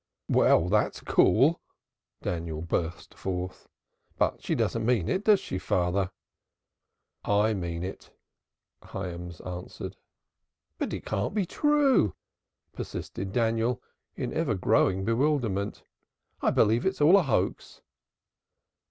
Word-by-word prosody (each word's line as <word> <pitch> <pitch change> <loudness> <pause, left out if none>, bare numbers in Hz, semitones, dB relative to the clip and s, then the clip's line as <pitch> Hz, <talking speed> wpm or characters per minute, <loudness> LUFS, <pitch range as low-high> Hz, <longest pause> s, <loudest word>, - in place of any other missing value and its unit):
"Well, 85 - +4
that's 105 +3 +1
cool!" - - +4 0.6
Daniel 80 -2 -3
burst 85 0 -3
forth. 90 -1 -5 0.5
"But - - +1
she - - -1
doesn't 115 - 0
mean 110 -7 +2
it, 190 - -1
does 210 -3 +6
she, 95 - -4
father?" 90 +1 0 1.1
"I 105 +2 +2
mean 85 -3 -3
it." 95 - -7 0.7
Hyams 90 -3 -6
answered. 90 0 -7 0.8
"But - - -2
it - - -5
can't 100 - -2
be 205 -3 +1
true," 280 - +3 0.6
persisted 95 0 -5
Daniel, 115 +1 +1 0.4
in - - -3
ever - - 0
growing 95 +1 +2
bewilderment. 115 -5 0 0.6
"I - - +3
believe 115 +3 +3
it's 190 0 -1
all 160 +6 +7
a - - +5
hoax." 135 -9 -1
100 Hz, 115 wpm, -28 LUFS, 90-125 Hz, 1.1 s, all